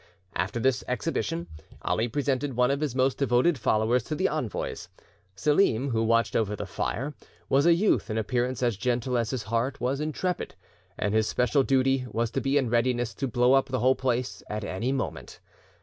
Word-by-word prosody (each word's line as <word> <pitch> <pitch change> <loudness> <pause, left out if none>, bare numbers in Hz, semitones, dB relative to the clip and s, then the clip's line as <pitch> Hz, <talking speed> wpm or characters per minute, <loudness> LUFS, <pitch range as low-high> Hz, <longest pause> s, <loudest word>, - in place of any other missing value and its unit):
After 120 - -1
this 130 -1 +1
exhibition, 85 +1 -2 0.4
Ali 115 +2 0
presented 135 +1 -1
one 125 +2 +3
of 140 +1 -1
his 145 -5 -1
most 130 0 +1
devoted 130 +3 +2
followers 110 +3 +2
to 155 - -3
the 185 +4 +1
envoys. 150 -9 -4 0.5
Selim, 140 - +2
who 115 -1 +1
watched 115 +1 +2
over 105 -2 +1
the - - -5
fire, 140 +6 -3 0.4
was 140 +4 +4
a 170 - +6
youth 200 - +1
in 110 - -2
appearance 125 +3 -1
as 120 -5 +1
gentle 125 +2 -1
as 115 -2 0
his 130 -5 -3
heart 115 +5 -1
was 130 +3 -1
intrepid, 165 +4 -2 0.4
and 105 - -1
his 110 -1 +2
special 125 +3 +2
duty 135 -1 +2
was 115 0 -1
to - - -1
be 135 +1 +1
in 135 -3 +2
readiness 120 0 +1
to 135 - -3
blow 125 +2 +3
up 135 0 +4
the 130 -1 -1
whole 130 +1 +4
place 125 -1 -2
at 105 0 -3
any 100 +6 -2
moment. 135 -2 -4
125 Hz, 190 wpm, -27 LUFS, 115-135 Hz, 0.5 s, a